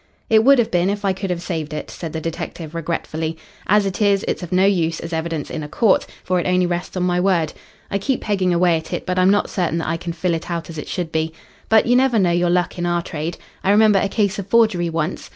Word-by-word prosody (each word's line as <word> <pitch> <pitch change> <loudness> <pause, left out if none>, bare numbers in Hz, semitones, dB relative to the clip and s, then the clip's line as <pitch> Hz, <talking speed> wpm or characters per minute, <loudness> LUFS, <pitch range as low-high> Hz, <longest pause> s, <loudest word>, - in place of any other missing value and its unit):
"It 220 0 +6
would 275 +3 +6
have 235 -2 +1
been 175 +1 +2
if 205 0 -2
I 195 - +2
could 195 +1 -5
have 175 -1 -2
saved 155 -4 -4
it," - - -6
said 165 -3 -6
the 160 - -3
detective 165 0 -6
regretfully. 165 -1 -3 0.3
"As 205 +1 +4
it 195 +2 -3
is, 200 -1 +3
it's - - -1
of 175 - -7
no 185 +1 +4
use 165 -5 +1
as 165 0 -6
evidence 160 -2 -3
in 155 - -4
a 150 - -5
court, 200 +5 +2 0.2
for 185 0 +1
it 175 - -2
only 180 0 +3
rests 175 +1 -3
on 180 - 0
my 180 0 +1
word. 180 -4 +1 0.4
I 200 - 0
keep 265 +6 -1
pegging 190 -4 0
away 175 -1 +3
at 160 - -7
it, - - -3
but 185 0 0
I'm 185 +1 +5
not 205 +1 +2
certain 175 -3 0
that 165 - -3
I 165 - 0
can 170 0 -5
fill 170 +1 -1
it 165 +1 -4
out 170 -1 -4
as 160 - -7
it - - -7
should 175 -3 -3
be. 160 0 -1 0.4
But 220 -1 +5
you 245 - +3
never 255 -2 +3
know 185 -4 +3
your 175 0 +2
luck 175 0 0
in 175 - -1
our 175 0 0
trade. 160 +1 -4 0.3
I - - +1
remember 210 -1 +5
a 195 - 0
case 200 -1 0
of 200 - -5
forgery 210 -6 +3
once. 165 +2 -3
180 Hz, 270 wpm, -20 LUFS, 165-195 Hz, 0.4 s, It